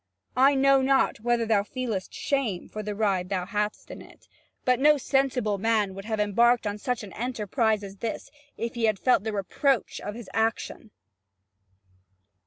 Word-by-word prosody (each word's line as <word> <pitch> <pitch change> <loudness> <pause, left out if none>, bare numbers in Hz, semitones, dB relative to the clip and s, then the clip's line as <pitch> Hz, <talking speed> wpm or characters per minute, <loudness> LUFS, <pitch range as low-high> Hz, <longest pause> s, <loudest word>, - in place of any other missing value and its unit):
I 270 +2 +5
know 275 0 +4
not 265 -3 +2
whether 235 +1 +1
thou 215 -2 +3
feelest 220 -3 -4
shame 250 -11 -2
for 215 - -6
the 210 0 -4
ride 195 -4 0
thou 185 -3 -1
hadst 210 +1 -3
on - - -9
it, - - -17 0.4
but 250 -1 +3
no 300 +2 +5
sensible 255 -6 0
man 215 -2 +1
would 195 +1 -9
have 220 -1 -2
embarked 235 +3 +3
on 205 0 -3
such 245 +1 -2
an 200 - -10
enterprise 220 -2 -1
as 195 0 -9
this 225 +2 -5 0.3
if 230 0 -3
he 235 -1 0
had 215 -2 +2
felt 250 0 +2
the 220 - -2
reproach 225 +6 0
of 205 - -6
his 235 -4 -9
action." 225 0 -1
220 Hz, 175 wpm, -26 LUFS, 205-250 Hz, 0.4 s, I